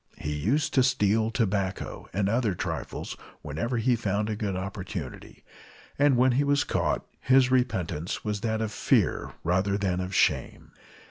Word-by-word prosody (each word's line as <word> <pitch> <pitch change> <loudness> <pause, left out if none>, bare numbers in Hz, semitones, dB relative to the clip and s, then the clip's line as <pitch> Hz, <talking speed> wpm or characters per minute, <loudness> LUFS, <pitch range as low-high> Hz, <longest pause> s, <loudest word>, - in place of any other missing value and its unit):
He 75 - -3
used 115 - 0
to 130 - +5
steal 110 -4 +2
tobacco 100 -4 -2
and 100 +1 0
other 110 -2 +1
trifles - - -4 0.3
whenever 80 - -2
he 120 +2 +2
found 105 -1 -1
a - - -1
good 105 -3 -2
opportunity, 95 - -6 0.6
and 145 -3 +4
when 130 +1 +5
he 135 +4 +2
was 145 0 +2
caught - - -1
his 130 -1 +4
repentance 95 -11 -1
was 105 -1 -2
that 110 -1 -1
of 110 -2 -2
fear - - +1
rather 95 +3 +1
than 95 -3 0
of 90 +1 -3
shame. - - +1
105 Hz, 155 wpm, -27 LUFS, 95-125 Hz, 0.6 s, to